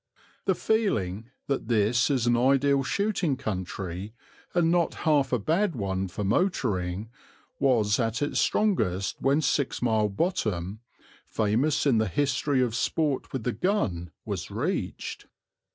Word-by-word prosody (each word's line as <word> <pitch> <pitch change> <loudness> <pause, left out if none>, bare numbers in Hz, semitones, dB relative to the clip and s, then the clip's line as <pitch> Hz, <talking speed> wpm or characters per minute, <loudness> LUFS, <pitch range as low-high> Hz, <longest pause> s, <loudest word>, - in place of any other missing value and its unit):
The 190 - +2
feeling 115 - 0 0.2
that 135 -5 -2
this 115 +3 +2
is 130 -4 +1
an 120 0 +3
ideal 135 +3 +3
shooting 180 -2 0
country, 95 -2 -5 0.4
and 170 -2 +2
not 175 -1 +1
half 145 -4 +3
a 125 - +3
bad 165 - 0
one 95 -3 -2
for 95 +3 -5
motoring, 105 - 0 0.5
was 115 -6 +3
at 115 -1 0
its 145 - 0
strongest 100 - +1
when 140 +4 +3
Six 140 -3 0
Mile 110 -3 +2
Bottom, 105 - -1 0.5
famous 120 +9 +1
in 125 -6 +4
the 110 - +1
history 135 - +1
of 120 -3 -1
sport 145 +3 -1
with 130 -4 -3
the 125 - 0
gun, 95 - -1 0.2
was - - -4
reached. - - -3
125 Hz, 135 wpm, -27 LUFS, 105-145 Hz, 0.5 s, in